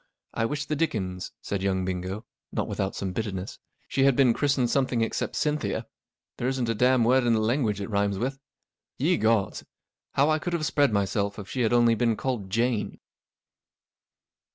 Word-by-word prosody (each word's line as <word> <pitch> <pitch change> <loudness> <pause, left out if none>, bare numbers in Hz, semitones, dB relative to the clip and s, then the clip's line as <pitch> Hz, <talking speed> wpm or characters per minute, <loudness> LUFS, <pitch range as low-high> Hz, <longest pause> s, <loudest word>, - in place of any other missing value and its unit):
I 115 - 0
wish 145 +4 -2
the 150 - -1
dickens," 95 - -2
said 100 -2 -2
young 95 -1 0
Bingo, 95 +3 -4 0.3
not - - -2
without 95 0 -2
some 95 -2 -3
bitterness, 100 -3 -4 0.2
44 - - -37
she 135 - +2
had 135 -2 +5
been 130 -3 +5
christened 135 -4 +1
something 130 -3 +1
except 115 - -1
Cynthia. 150 -1 -1 0.5
There 125 - -1
isn't 130 -2 0
a - - +2
dam' 125 +2 +3
word 130 +3 +4
in 120 -1 +3
the 110 - +3
language 110 -2 +1
it 100 - -4
rhymes 100 -2 0
with. 135 +6 -2 0.6
Ye 165 +7 +2
gods, 110 -3 +1 0.5
how 145 +3 +3
I 155 - +2
could 175 +2 -3
have 165 -3 0
spread 145 -3 +3
myself 100 0 0
if 100 -2 -7
she 130 - -3
had 115 - +2
only 120 -1 +5
been 115 0 +1
called 120 -8 -3
Jane 115 +1 0
115 Hz, 185 wpm, -27 LUFS, 100-135 Hz, 0.6 s, had